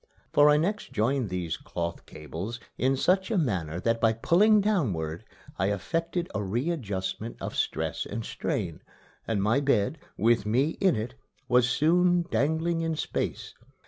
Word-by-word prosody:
For 145 0 +7
I 150 - +5
next 200 +7 -1
joined 120 +1 0
these 90 -3 -3
cloth 85 0 -5
cables 85 - -6 0.2
in 135 +2 +1
such 190 +6 +2
manner 95 - 0
that 115 +1 0
by 115 -1 +4
pulling 205 - +4
downward 105 - 0 0.4
I 95 - +2
effected 165 - -2
a 105 - -1
readjustment 110 - -3
of - - -5
stress - - -1
and 110 +2 -5
strain, - - -3 0.5
and 105 -4 0
my 110 +6 +3
bed, 140 0 +1 0.2
with 115 0 +3
me 125 +8 +2
in 190 -7 +4
it, 115 +3 -3 0.3
was 125 0 +4
soon 175 +6 +3
dangling 160 +7 +1
in 165 -1 -1
space. - - -3
125 Hz, 145 wpm, -27 LUFS, 100-165 Hz, 0.5 s, For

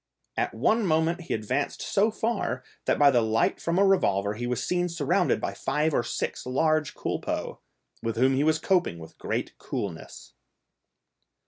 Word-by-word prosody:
At - - -1
one 225 +1 +2
moment 160 +2 +1
he 175 - -2
advanced 125 +6 -2
so 205 +3 +2
far, 225 +2 -2 0.2
that - - +2
by 145 -1 +6
the 120 -3 +4
light 110 0 +1
from 170 +1 0
a 200 - +5
revolver 100 - +2
he 120 +3 -4
was 125 -1 -1
seen 180 0 0
surrounded 165 -4 +1
by - - -3
five 155 +1 0
or - - +3
six - - -3
large 155 +3 +1
culpeux, - - -3 0.4
with 115 -1 -2
whom 130 +3 +3
he 140 - +2
was 155 +1 +3
coping 175 - +1
with 80 -1 -12
great - - -3
coolness. 90 -6 -6
150 Hz, 165 wpm, -27 LUFS, 115-175 Hz, 0.4 s, by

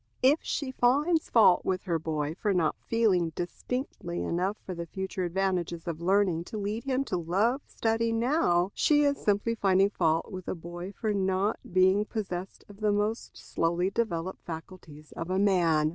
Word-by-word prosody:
If 280 +5 +5
she 275 -3 -3
finds 290 +7 +2
fault 205 -6 +5
with 185 -1 -1
her 170 -4 -1
boy 155 -1 -2
for 200 +2 -1
not 160 -4 +1
feeling 190 -8 +2
distinctly 175 - -4
enough 185 - -1
the 170 -2 -5
future 190 0 -4
advantages 175 -2 -1
of 165 -1 -4
learning 185 -2 +2
to 215 - -6
lead 210 +4 -3
him 270 0 0
to 185 - -2
love 200 - +1
study 225 0 0
now, 225 - +2
she 295 -1 +3
is 285 -1 +1
simply 205 +2 +1
finding 195 -2 +3
fault 165 0 0
with 185 -2 -7
a - - -2
boy 175 +2 -7
for 215 +1 -2
not 190 +2 0
being 185 +3 +4
possessed 190 -4 -5
of 205 0 -14
the 215 -1 +2
most 210 +2 -2
slowly 170 +3 -1
developed 190 -5 -2
faculties 160 -2 -9
of 165 - -6
a 185 - 0
man. 170 -6 +3
190 Hz, 170 wpm, -28 LUFS, 175-220 Hz, -, If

